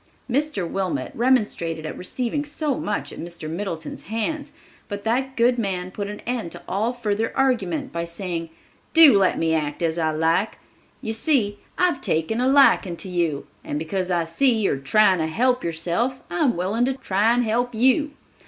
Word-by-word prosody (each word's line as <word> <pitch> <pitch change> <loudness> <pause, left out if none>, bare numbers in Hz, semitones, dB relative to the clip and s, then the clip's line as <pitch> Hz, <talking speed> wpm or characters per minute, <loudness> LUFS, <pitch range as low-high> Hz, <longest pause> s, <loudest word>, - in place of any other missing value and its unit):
Mr. 270 - -1
Wilmot 190 0 -2
remonstrated 210 -10 0
at 155 - -5
receiving 250 +9 -3
so 295 0 -2
much 210 -4 -3
at - - -10
Mr. 170 -2 -7
Middleton's 165 -1 -5
hands, 285 - -3 0.4
but 205 -1 -6
that 260 +4 0
good 240 +1 +3
man 185 -4 -2
put 200 +1 -4
an 210 - -7
end 240 -8 -3
to - - -9
all 215 +5 0
further 225 -2 -1
argument 245 -11 0
by 170 0 -2
saying, 170 -1 -4 0.5
"Do 320 -8 +9
let 195 -2 +3
me 165 0 +1
act 150 0 -1
as 165 0 0
I 160 -1 +1
like. 165 +6 +1 0.5
You 220 - -2
see, 220 -5 +1 0.2
I've 350 -7 +2
taken 165 +9 0
a 255 - +2
liking 265 -10 +4
to 190 - -6
you, 170 -5 -1 0.2
and 145 - -3
because 180 +4 -2
I 175 -2 +1
see 245 +11 +2
you 200 -11 0
trying 190 +7 +4
to 160 - 0
help 250 +9 +1
yourself, 170 +10 -1
I 175 - -2
am 240 -9 +1
willing 200 +7 +1
to 265 0 0
try 215 -3 +2
and 245 +1 +2
help 240 +2 0
you. 265 +5 +2
205 Hz, 180 wpm, -23 LUFS, 170-250 Hz, 0.5 s, Do